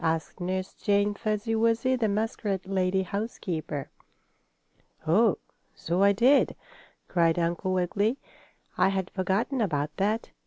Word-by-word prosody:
asked 160 +1 -1
Nurse 185 +1 -2
Jane 205 0 +1
Fuzzy 215 +2 -2
Wuzzy, 230 +3 +2
the 235 -3 +1
muskrat 205 -2 -2
lady 190 0 +1
housekeeper. 180 - -4 1.1
"Oh, 195 +5 +4 0.4
so 175 +3 -1
I 200 0 +6
did!" 245 +8 +4 0.5
cried 170 -2 +2
Uncle 175 +2 -1
Wiggily. 200 +6 +1 0.6
"I 185 - +5
had 190 -1 -2
forgotten 200 +8 0
about 150 -7 -1
that. 210 +4 -1
195 Hz, 120 wpm, -27 LUFS, 175-220 Hz, 1.1 s, I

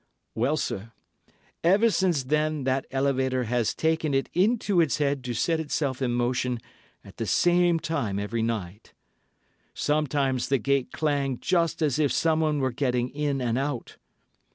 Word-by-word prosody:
Well, 130 +7 +1
sir, 115 -4 -4 0.7
ever 200 +7 +4
since 180 -8 +1
then 150 +1 0
that 130 +1 0
elevator 130 -1 0
has 120 -1 0
taken 160 -2 0
it 135 - 0
into 200 -1 +2
its 150 -7 +1
head 140 -3 0
to 120 -1 -3
set 165 +7 +1
itself 145 -4 -2
in 130 - +1
motion 125 +1 0 0.5
at - - -14
the - - -3
same 175 -1 +3
time 140 -13 -2
every 105 +3 -2
night. 110 -3 -4 0.8
Sometimes 145 -4 0
the 135 - +3
gates 135 +2 0
clang 140 -4 -1
just 165 -3 +1
as 150 -1 +1
if 145 -4 +2
someone 155 -2 +1
were 130 -1 +1
getting 125 -1 0
in 145 -1 -2
and 120 +1 0
out. 140 -3 -4
140 Hz, 155 wpm, -26 LUFS, 125-155 Hz, 0.8 s, ever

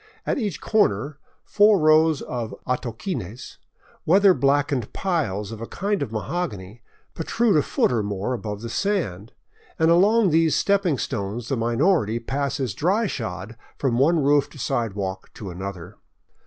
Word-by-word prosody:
At - - 0
each 200 - -3
corner 140 - +1 0.3
four 210 0 +5
rows 155 -1 +4
of 120 -3 -5
atoquines, 125 - -4 0.4
weather 195 +3 +5
blackened 140 -5 +1
piles 110 - -2
of 115 -1 -8
a 115 - -5
kind 200 0 -2
of 135 -6 -3
mahogany, 110 - -4 0.3
protrude 215 +6 +1
a 150 - +5
foot - - +1
or 120 -3 +1
more 100 +3 -3
above 105 -4 -5
the 115 - -6
sand; 125 - -2 0.5
and 160 +1 +3
along 200 +3 +4
these 160 0 +3
stepping 195 -7 +2
stones 110 +2 -4
the 135 - +1
minority 120 - +1
passes 135 0 -2
dry 195 +9 +1
shod 110 - -5 0.2
from 125 -4 0
one 155 +2 +3
roofed 140 0 +2
sidewalk 100 -6 -3
to 100 -4 -7
another. 95 +1 -7
135 Hz, 140 wpm, -23 LUFS, 110-170 Hz, 0.5 s, four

